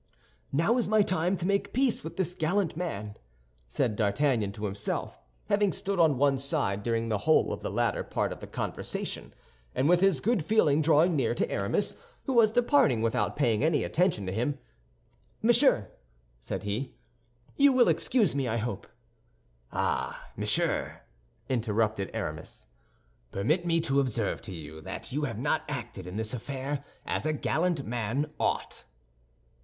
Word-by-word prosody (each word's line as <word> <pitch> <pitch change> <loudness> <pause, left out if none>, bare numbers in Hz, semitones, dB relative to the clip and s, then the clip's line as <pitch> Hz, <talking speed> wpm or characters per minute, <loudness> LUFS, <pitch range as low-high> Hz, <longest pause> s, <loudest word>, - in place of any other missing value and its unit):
"Now 165 - +2
is 245 - +1
my 215 0 +4
time 185 0 0
to 175 - -4
make 200 +1 0
peace 255 -1 +2
with 160 +2 -7
this 180 -2 0
gallant 180 0 0
man," 105 - -4 0.5
said 105 - 0
D'Artagnan 110 0 +1
to 105 +1 -5
himself, 100 +1 -3 0.3
having 205 -1 +3
stood 195 -1 -2
on 155 -5 +4
one 140 0 +3
side 135 -8 -1
during 115 +1 -1
the 105 -2 0
whole 155 +8 +3
of - - -6
the - - -3
latter - - 0
part - - -1
of - - -12
the - - -9
conversation; - - -4 0.4
and 135 - +2
with 175 +1 +5
this 190 -6 +3
good 220 - +1
feeling 160 -6 +3
drawing 160 +2 +4
near 120 -4 +1
to - - 0
Aramis, 100 - 0 0.3
who 270 - -2
was 225 -3 +5
departing 245 - +3
without 115 +2 0
paying 120 -5 +2
any 155 -2 +2
attention 170 - +1
to 95 - -3
him, 125 +7 -1 0.9
"Monsieur," 235 - +4 0.5
said - - -5
he, 105 +6 -3 0.6
"you 280 0 +6
will 255 -2 +5
excuse 240 -5 +2
me, 135 -2 -1
I 115 0 0
hope." 110 -3 -4 0.8
"Ah, - - -2
monsieur," - - -1 0.5
interrupted 110 -4 0
Aramis, - - -5 0.6
"permit 155 - 0
me 165 -1 +3
to 140 -3 +1
observe 120 -6 -1
to - - -8
you 80 -2 -8
that - - -6
you 145 +3 -1
have 115 -6 -4
not 150 +6 +1
acted 115 -9 -5
in 90 - -7
this 110 +1 -2
affair 135 +3 -4 0.2
as - - -2
a 155 +1 0
gallant 160 0 0
man 120 +6 -2
ought." - - -1
145 Hz, 160 wpm, -29 LUFS, 110-180 Hz, 0.9 s, you